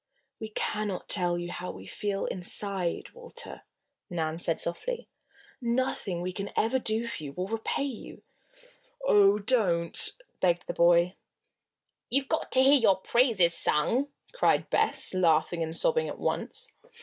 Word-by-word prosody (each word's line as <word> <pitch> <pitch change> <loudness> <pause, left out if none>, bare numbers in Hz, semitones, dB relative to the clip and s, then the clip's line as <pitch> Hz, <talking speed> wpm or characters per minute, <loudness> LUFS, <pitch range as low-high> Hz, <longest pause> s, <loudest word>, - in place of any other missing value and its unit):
"We 220 - -6
cannot 210 -2 -2
tell 175 -3 +2
you 175 0 -5
how 180 +1 -5
we 95 - -9
feel, 200 - -3
inside, 185 -1 -1
Walter," 480 0 -7 0.5
Nan 160 -1 -2
said 165 -1 0
softly. 480 - -3 0.5
"Nothing 235 -7 -1
we 180 +1 -3
can 200 +1 -4
ever 245 +4 +2
do 225 -1 -1
for 235 - -5
you 140 -1 -7
will 180 +5 -3
repay 225 +5 -2
you 270 -6 -7 0.4
" - - -13
"Oh, 200 0 +6
don't!" 200 -7 +2 0.3
begged 175 -1 +1
the - - -4
boy. 170 +1 +4 1.0
"You've 270 +2 0
got - - -1
to 260 - +5
hear 275 +1 +6
your 200 -5 +4
praises 195 -4 +2
sung!" 195 - +1 0.3
cried - - +2
Bess, - - +1
laughing 170 -2 +2
and 160 0 -2
sobbing 480 -1 +1
at - - -6
once. - - -3
200 Hz, 150 wpm, -28 LUFS, 175-245 Hz, 1.0 s, Oh